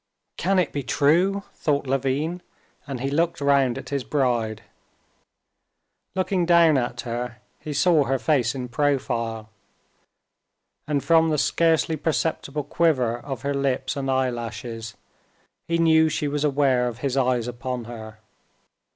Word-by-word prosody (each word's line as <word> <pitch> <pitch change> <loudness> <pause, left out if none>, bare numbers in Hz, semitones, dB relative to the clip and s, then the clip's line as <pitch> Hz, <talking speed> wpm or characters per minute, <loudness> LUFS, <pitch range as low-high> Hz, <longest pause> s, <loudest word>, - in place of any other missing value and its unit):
"Can 195 +2 +1
it 180 -5 +2
be 145 - -2
true?" 175 +9 +2
thought 145 -2 -1
Levin, 135 +6 -1 0.5
and 135 -4 -5
he 135 +1 -2
looked 170 +3 0
round 140 -3 +2
at 135 - -8
his 140 -2 -2
bride. 115 -4 -1 1.5
Looking 185 -1 0
down 170 -3 +6
at 120 -2 -1
her 120 0 -4 0.2
he 155 - -6
saw 150 +1 +3
her 135 0 +1
face 130 -4 +1
in 125 -2 -4
profile, 115 -5 -1 1.4
and 145 -2 0
from 165 -1 +4
the 155 - +1
scarcely 160 +1 +2
perceptible 155 0 -1
quiver 145 -6 +1
of 135 -2 -7
her 140 0 -1
lips 140 +2 -1
and 135 -1 -3
eyelashes 115 -3 -3 0.7
he 170 - +1
knew 160 -1 +4
she 150 -1 -1
was 145 0 -2
aware 135 -4 +2
of 120 -2 -5
his 135 -1 0
eyes 125 -3 +1
upon 125 0 -4
her. 110 -2 -9
140 Hz, 140 wpm, -24 LUFS, 125-155 Hz, 1.5 s, down